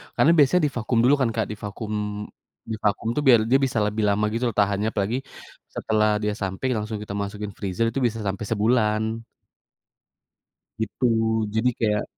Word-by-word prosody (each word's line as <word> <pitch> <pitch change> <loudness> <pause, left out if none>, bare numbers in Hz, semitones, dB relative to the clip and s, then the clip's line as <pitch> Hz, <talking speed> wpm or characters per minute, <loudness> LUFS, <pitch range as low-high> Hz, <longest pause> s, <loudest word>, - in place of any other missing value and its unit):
Karena 165 - +5
biasanya 155 +5 +5
divakum 120 -2 -1
dulu 135 +4 +5
kan 125 - +2
Kak, 110 -2 0
divakum 105 0 -4 0.4
divakum 110 -1 -1
tuh 150 - 0
biar 120 -3 +8
dia 130 +3 +4
bisa 120 -4 -1
lebih 105 +1 -1
lama 105 +1 +2
gitu 115 +2 -2
loh - - -19
tahannya, 100 +1 +1
apalagi 105 +4 -1 0.6
setelah 110 -1 +1
dia 105 0 0
sampai 100 +4 -3
langsung 105 0 -3
kita 105 -1 -6
masukin 100 +1 -4
freezer 100 +2 -1
itu 135 - -2
bisa 115 -2 0
sampai 100 +1 -3
sebulan. 110 0 +1 1.6
Gitu, 110 +3 -2 0.5
jadi 110 +3 +2
kayak, 105 -2 +1
110 Hz, 160 wpm, -24 LUFS, 105-115 Hz, 1.6 s, biar